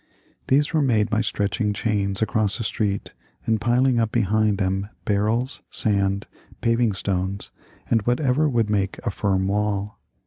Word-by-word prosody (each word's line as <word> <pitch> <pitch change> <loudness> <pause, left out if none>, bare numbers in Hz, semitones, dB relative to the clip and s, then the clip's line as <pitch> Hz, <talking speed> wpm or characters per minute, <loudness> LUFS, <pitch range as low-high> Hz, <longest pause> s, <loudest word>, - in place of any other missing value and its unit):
These 145 +5 +2
were 155 - +3
made 115 -5 +2
by 110 -1 +2
stretching 105 +1 -1
chains 100 -1 -1
across 110 0 0
a - - -2
street 100 -2 -2 0.3
and 110 -2 +1
piling 120 +2 +2
up 115 -1 0
behind 110 -2 +2
them 95 +1 -1 0.2
barrels, 110 +5 0
sand, 100 -2 +1 0.3
paving 115 -2 +2
stones, 95 0 -2 0.4
and 115 - +2
whatever 135 +4 +2
would 115 -5 +1
make 100 -2 -1
a 115 - 0
firm 95 -1 0
wall. 105 0 -1
105 Hz, 145 wpm, -23 LUFS, 100-115 Hz, 0.4 s, were